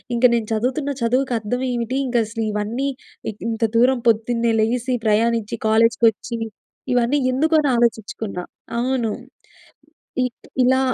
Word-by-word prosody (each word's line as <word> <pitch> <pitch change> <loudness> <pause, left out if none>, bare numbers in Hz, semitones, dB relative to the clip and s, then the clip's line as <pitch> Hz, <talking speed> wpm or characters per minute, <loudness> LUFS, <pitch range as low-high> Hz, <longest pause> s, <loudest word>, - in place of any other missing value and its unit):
ఇంక 235 +2 +3
నేను 225 -2 -1
చదువుతున్న 260 +6 -1
చదువుకి 250 +2 +1
అర్థం 245 +4 -3
ఏమిటి? 240 +1 -2
ఇంకా 245 -1 +1
అసలు, 225 +1 -4
ఇవన్నీ 220 +6 -1 0.4
ఇ - - -12 0.2
ఇంత 225 0 -2
దూరం 255 +3 +4
పొద్దున్నే 230 +1 +1
లేసి, 245 +3 0
ప్రయాణించి, 225 0 +1
కాలేజ్‌ 225 +1 +4
కొచ్చి, 225 +2 -1 0.6
ఇవన్నీ 245 +4 +2 0.2
ఎందుకు? 315 +5 +1
అని 290 - +1
ఆలోచించుకున్నా. 220 -5 -1 0.4
అవును. 245 -3 0 1.1
ఇ - - +2 0.4
ఇలా 260 +1 +4
235 Hz, 130 wpm, -21 LUFS, 225-255 Hz, 1.1 s, దూరం